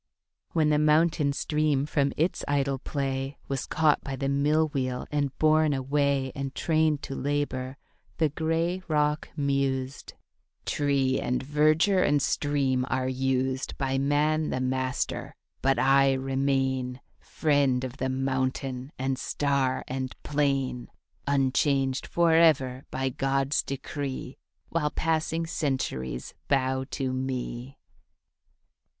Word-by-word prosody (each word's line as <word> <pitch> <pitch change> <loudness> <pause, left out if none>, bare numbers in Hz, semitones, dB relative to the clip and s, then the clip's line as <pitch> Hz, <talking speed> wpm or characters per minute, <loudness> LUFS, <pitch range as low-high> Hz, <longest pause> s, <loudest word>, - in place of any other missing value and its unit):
When 155 -2 +3
the 150 0 +3
mountain 150 -1 +3
stream 150 -1 0
from 140 -2 +1
its 165 +4 0
idle 140 -1 0
play 135 0 -3
Was 135 -2 -3
caught 155 -2 +2
by 135 -1 -4
the 135 +1 -2
mill 150 +3 +2
wheel 130 -3 -2
and 145 -2 -1
borne 155 -1 +4
away 135 0 0
And 135 0 -5
trained 155 -2 +1
to - - -5
labour, 135 -2 -2 0.4
the 160 -2 +2
gray 165 +4 -1
rock 150 -1 +1
mused, 140 -1 -1 0.5
'Tree 140 -2 +1
and 125 +1 -1
verdure 155 +7 +3
and 145 -4 +3
stream 140 -3 +1
are 130 0 0
used 130 0 -1
By 135 -1 0
man 150 +3 +1
the - - -1
master, 130 0 -2 0.3
but 135 +1 +2
I 135 0 +4
remain 135 -1 0 0.2
Friend 140 -4 +1
of 130 0 -5
the 130 - -1
mountain 130 0 -2
and 130 0 -1
star 140 -3 0
and 130 0 -4
plain, 135 -4 0 0.4
Unchanged 135 -1 +1
forever 160 -6 +3
by 135 0 -1
God's 135 +2 0
decree 135 -1 -5 0.3
While 155 -3 0
passing 160 +1 -1
centuries 130 - -3
bow 130 -1 +1
to 130 -1 -2
me.' 130 0 -4
135 Hz, 120 wpm, -27 LUFS, 130-150 Hz, 0.5 s, borne